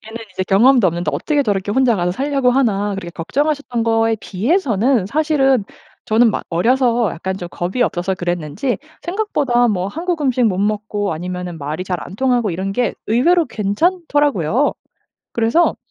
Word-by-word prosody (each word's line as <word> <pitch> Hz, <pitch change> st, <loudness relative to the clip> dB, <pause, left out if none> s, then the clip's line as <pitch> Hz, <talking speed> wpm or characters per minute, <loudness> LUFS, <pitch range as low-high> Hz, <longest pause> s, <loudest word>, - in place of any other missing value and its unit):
'얘는 220 Hz, -, -8 dB, 0.2 s
이제 185 Hz, -, -2 dB
경험도 225 Hz, +4 st, +4 dB
없는데 175 Hz, 0 st, -1 dB
어떻게 295 Hz, -2 st, 0 dB
저렇게 205 Hz, -4 st, -1 dB
혼자 245 Hz, 0 st, +3 dB
가서 175 Hz, -1 st, 0 dB
살려고 275 Hz, +3 st, +1 dB
하나.' 210 Hz, -6 st, +1 dB
그렇게 175 Hz, -3 st, -6 dB
걱정하셨던 260 Hz, -, -2 dB
거에 225 Hz, 0 st, +2 dB
비해서는 235 Hz, -, +1 dB
사실은 270 Hz, -4 st, +2 dB, 0.4 s
저는 225 Hz, +2 st, +4 dB
막 -, -, -3 dB
어려서 235 Hz, +4 st, +2 dB
약간 190 Hz, +3 st, -4 dB
좀 175 Hz, -2 st, -7 dB
겁이 185 Hz, +8 st, -2 dB
없어서 190 Hz, -4 st, -1 dB
그랬는지 175 Hz, -, -2 dB, 0.2 s
생각보다 295 Hz, -, +1 dB
뭐 185 Hz, -4 st, -1 dB
한국 335 Hz, -, -3 dB
음식 255 Hz, -2 st, +1 dB
못 195 Hz, -5 st, +1 dB
먹고 205 Hz, -1 st, -1 dB
아니면은 180 Hz, +1 st, -5 dB
말이 155 Hz, +5 st, -4 dB
잘 180 Hz, -1 st, -2 dB
안 190 Hz, -, -9 dB
통하고 245 Hz, -4 st, +1 dB
이런 190 Hz, +3 st, -3 dB
게 245 Hz, +2 st, 0 dB
의외로 330 Hz, +11 st, +3 dB
괜찮더라고요. 285 Hz, -, +1 dB, 0.6 s
그래서 235 Hz, +9 st, +2 dB
225 Hz, 370 characters per minute, -18 LUFS, 185-270 Hz, 0.6 s, 경험도